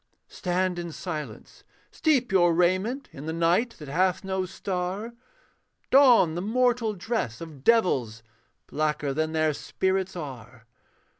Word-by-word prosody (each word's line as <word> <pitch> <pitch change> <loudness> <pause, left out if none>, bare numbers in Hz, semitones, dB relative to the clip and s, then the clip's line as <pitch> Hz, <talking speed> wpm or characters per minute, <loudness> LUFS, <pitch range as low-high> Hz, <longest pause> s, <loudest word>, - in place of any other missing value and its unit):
Stand 180 0 -1
in 170 -1 -5
silence: 155 -2 -7 0.3
steep 270 -8 +1
your 175 -3 +4
raiment 185 +10 +1
In 140 +3 -8
the - - -1
night 175 +8 +1
that 150 - -10
hath 180 +7 +1
no 190 -1 -2
star; 190 +4 -4 0.8
Don 250 - +6
the 175 - -3
mortal 230 +1 +1
dress 190 - -3
of 155 -5 -10
devils, 130 - +2 0.4
Blacker 150 -2 -1
than 155 +2 -1
their 155 -1 +2
spirits 190 +5 -2
are. 130 -7 -9
180 Hz, 130 wpm, -26 LUFS, 155-210 Hz, 0.8 s, Don